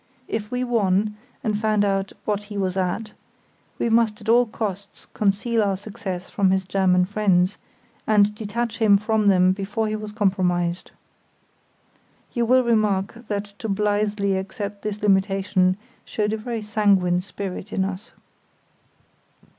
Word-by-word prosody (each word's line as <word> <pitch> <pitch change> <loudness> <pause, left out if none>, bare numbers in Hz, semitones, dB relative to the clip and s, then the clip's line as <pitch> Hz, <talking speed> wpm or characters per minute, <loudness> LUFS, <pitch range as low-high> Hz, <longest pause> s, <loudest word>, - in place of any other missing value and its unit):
If 210 -1 -3
we 250 0 -1
won, 210 -3 +1 0.3
and 215 -4 0
found 210 -1 +2
out 195 -1 0
"what 205 -1 -1
he 205 0 -7
was 190 -2 -1
at", 190 +4 -2 0.7
we - - 0
must 225 -2 +2
at 215 - -12
all 240 +1 +5
costs 200 -2 -5
conceal 215 +3 +1
our 200 -2 +1
success 195 -3 -6
from 195 -2 +1
his 190 0 +1
German 185 -1 +3
friends, 195 -2 +1 0.5
and 210 -1 +4
detach 225 +2 -3
him 210 -3 +6
from 215 0 +1
them 185 -2 +5
before 205 +3 -2
he 215 - -1
was 215 -1 -6
compromised. 185 -4 0 1.4
(You 235 -2 0
will 255 +1 +5
remark 215 0 0
that 205 0 -3
to 225 - -4
blithely 205 0 +1
accept 200 +1 -5
this 210 -1 -4
limitation 195 -2 +2 0.3
showed 210 0 -1
a - - -1
very 225 0 -4
sanguine 200 -4 +2
spirit 195 +1 -6
in 190 - 0
us.) 195 +1 -6
205 Hz, 145 wpm, -23 LUFS, 190-215 Hz, 1.4 s, him